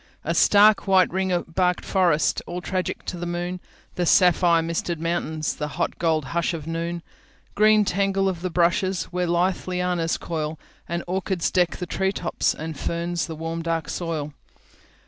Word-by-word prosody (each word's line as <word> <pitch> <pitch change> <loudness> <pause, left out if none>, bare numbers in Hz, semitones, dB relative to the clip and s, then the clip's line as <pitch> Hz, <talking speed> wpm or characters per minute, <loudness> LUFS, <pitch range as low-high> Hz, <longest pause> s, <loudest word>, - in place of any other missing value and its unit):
The - - -1
stark 210 0 +5
white 190 -2 +4
ring 185 -2 0
barked 180 +1 0
forests, 175 -5 +2
All 175 +1 -4
tragic 185 0 -3
to 180 - -4
the 175 0 -4
moon, 175 +1 -3 0.3
The 175 -1 -1
sapphire 175 -2 +4
misted 170 0 -2
mountains, 160 -2 -2
The 150 - -3
hot - - -2
gold 160 -3 +1
hush 170 0 0
of 155 -3 -7
noon. 165 +1 -3 0.5
Green 215 0 +5
tangle 195 0 +1
of 180 -3 -2
the 185 - -2
brushes, 175 +2 +1
Where 180 0 0
lithe 175 +3 0
lianas 180 -2 0
coil, 155 -2 -3 0.3
And 170 0 -2
orchids 185 -1 -1
deck 180 -2 +1
the 180 - -4
tree 190 +2 0
topsAnd 160 -5 -2
ferns 170 +2 -2
the 160 - -6
warm 165 +1 -4
dark 165 -1 -2
soil. 160 -4 -3
175 Hz, 165 wpm, -24 LUFS, 165-185 Hz, 0.5 s, stark